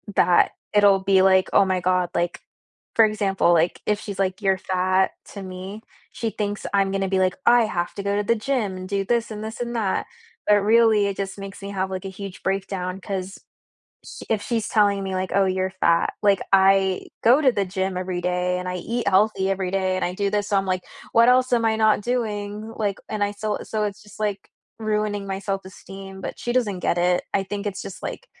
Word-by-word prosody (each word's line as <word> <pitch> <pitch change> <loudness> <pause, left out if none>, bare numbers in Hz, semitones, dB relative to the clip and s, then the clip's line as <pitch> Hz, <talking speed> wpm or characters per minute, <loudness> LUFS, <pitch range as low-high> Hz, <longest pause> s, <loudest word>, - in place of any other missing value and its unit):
That 175 - +4 0.2
it'll 205 -2 +5
be 190 -1 +4
like, 190 -1 +4
"Oh 200 - +6
my 185 -1 0
god," 180 0 +1
like, 175 0 -1 0.6
for 225 - +7
example, 195 -4 +2
like, 170 +1 +1
if 210 -1 +1
she's 200 -2 -7
like, 190 0 0
"You're 195 -2 +2
fat," 185 0 +1 0.2
to 200 - -7
me, 190 +3 -7 0.3
she 230 - -3
thinks 205 -1 -4
I'm 195 -1 +2
gonna 195 0 -1
be 190 - +1
like, 185 -1 +2
"I 240 -1 +6
have 175 -5 -2
to 200 - -5
go 200 0 0
to 205 - 0
the 230 +3 +2
gym, 215 -5 -1
and 185 0 -7
do 200 0 -1
this, 230 +1 0
and 215 0 -6
this, 220 +1 -6
and 240 0 -3
that," 205 -5 0 0.4
but 210 - +6
really, 220 -1 +4
it 200 - -3
just 195 0 -4
makes 195 0 -8
me 200 0 -6
have, 190 -1 -2
like, 185 0 -5
a - - -3
huge 195 0 -9
breakdown, 190 -1 -2
'cause 190 -1 -5 0.7
sh - - -10
if 215 -2 0
she's 225 +1 -2
telling 205 -2 +2
me 190 0 -3
like, 185 0 -2
"Oh, 195 - +4
you're 190 0 0
fat," 170 0 +3
like, 200 -2 +4
I 195 -1 +4 0.2
go 250 +6 +6
to 265 -4 +4
the 200 -3 0
gym 190 0 -2
every 180 -1 -3
day, 180 0 0
and 180 0 -5
I 180 - -2
eat 235 +7 -3
healthy 195 0 +2
every 190 -1 -1
day, 190 -1 0
and 185 - -1
I 175 - -1
do 200 +1 0
this, 205 0 -1
so 205 - +1
I'm 195 0 +1
like, 185 -1 -1 0.3
"What 230 +1 +5
else 255 0 +4
am 235 -2 +3
I 220 -1 +2
not 220 -1 +3
doing?" 215 -2 -3
Like, 205 -3 -1
and 215 -1 -3
I 205 - -1
still 210 0 -3
so, 215 -1 -2
it's 205 -1 -5
just, 210 - -15
like, 205 -2 -3 0.3
ruining 210 -2 -1
my 195 0 -2
self-esteem, 195 0 -7
but - - -6
she 240 - -2
doesn't 215 -7 0
get 175 - 0
it, 180 0 +2
I 195 - +2
think 200 +1 -5
it's 200 -2 -3
just, 190 - -9
like, - - -6
195 Hz, 225 wpm, -23 LUFS, 190-210 Hz, 0.7 s, for